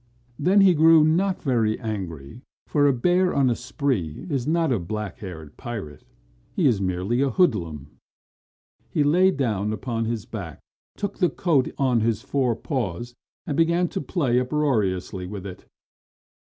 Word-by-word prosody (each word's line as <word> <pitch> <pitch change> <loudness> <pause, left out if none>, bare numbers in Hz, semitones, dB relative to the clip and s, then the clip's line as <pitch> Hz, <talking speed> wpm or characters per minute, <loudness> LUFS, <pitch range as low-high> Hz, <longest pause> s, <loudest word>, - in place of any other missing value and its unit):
Then 185 +7 +4
he 190 -2 +6
grew 160 0 +6
not 180 +5 +1
very 115 -6 +1
angry, 95 - -6 0.2
for 145 -1 +2
a - - +5
bear 180 +8 +2
on 135 -3 +3
a - - +1
spree 125 - -3
is 135 -3 -1
not 165 -2 +1
a 120 - +1
black 105 +4 -5
haired 80 -7 -9
pirate. 100 - -7 0.5
He 180 - +1
is 115 -8 +3
merely 95 +6 -1
a 140 - +2
hoodlum. 90 - 0 1.0
He 150 - +1
lay 180 +6 +4
down 110 - -1
on 115 -3 -1
his 115 -2 -3
back, 100 - -7 0.4
took 200 -1 -4
the 180 -3 +3
coat 145 -4 +1
on 130 -4 +2
his 110 -1 0
four 130 -4 0
paws 120 - -4 0.3
and 145 - -2
began 170 +2 +2
to - - -4
play 135 -5 0
uproariously 110 -10 -1
with 100 0 -7
it. 90 -2 -9
125 Hz, 155 wpm, -24 LUFS, 100-150 Hz, 1.0 s, he